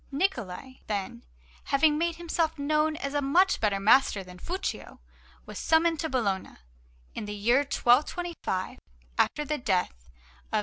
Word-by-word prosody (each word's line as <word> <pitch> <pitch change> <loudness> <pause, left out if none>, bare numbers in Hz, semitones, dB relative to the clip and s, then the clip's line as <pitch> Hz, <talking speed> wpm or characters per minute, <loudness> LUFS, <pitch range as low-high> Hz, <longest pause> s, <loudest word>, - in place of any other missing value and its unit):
Niccola, 260 - -2
then, 195 - -4 0.4
having 295 +2 +3
made 335 +2 0
himself 330 -1 -1
known 305 +2 +1
as 275 -2 -4
a 290 - +1
much 340 +8 +3
better 205 -3 +1
master 210 -1 +4
than 180 -1 -13
was - - -18
Fuccio, 370 +2 -4 0.5
was - - -8
summoned 325 0 +2
to 320 - -2
Bologna 205 -8 -2 0.6
in - - -5
the 210 0 -5
year 230 +5 +3
1225, 280 - 0 0.4
after 300 - +1
the 300 +1 -2
death 180 - -1 0.4
of - - +1
S. - - +3
275 Hz, 150 wpm, -28 LUFS, 205-320 Hz, 0.6 s, master